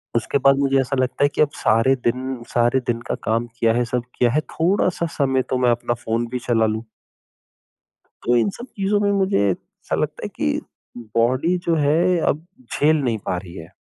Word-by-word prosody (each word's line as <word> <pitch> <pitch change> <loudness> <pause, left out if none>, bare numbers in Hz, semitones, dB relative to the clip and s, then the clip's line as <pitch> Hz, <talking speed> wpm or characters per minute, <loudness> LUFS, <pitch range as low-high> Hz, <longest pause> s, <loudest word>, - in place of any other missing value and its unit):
उसके 115 +4 +1
बाद 135 0 +4
मुझे 135 -1 +2
ऐसा 135 +1 -1
लगता 130 +2 0
है 145 - +5
कि - - +2
अब 150 - +4
सारे 115 +5 +3
दिन 130 +1 -2
सारे 120 +2 +2
दिन 115 -1 0
का - - -1
काम 115 +2 0
किया 115 -1 +3
है 120 +1 +1
सब 125 - +1 0.2
किया 120 -1 +4
है 150 - +2
थोड़ा-सा 175 0 +1
समय 135 -2 +2
तो 130 - +1
मैं - - +5
अपना 120 0 0
फ़ोन 115 +1 0
भी 125 - -2
चला 115 -2 +3
लूँ। 110 +1 -2 1.4
तो 120 - +3
इन 120 +12 +3
सब 240 - -7
चीज़ों 205 +1 +1
में 205 -1 +2
मुझे 195 - +2
ऐसा 90 - -4
लगता - - -3
है - - -4
कि 75 - 0 0.6
बॉडी 130 +10 +2
जो 170 - +2
है 165 +4 +2
अब 155 +3 0 0.3
झेल 155 +2 +3
नहीं 120 -4 0
पा 90 - 0
रही 90 -2 -9
है। 80 +1 -10
130 Hz, 205 wpm, -21 LUFS, 115-155 Hz, 1.4 s, है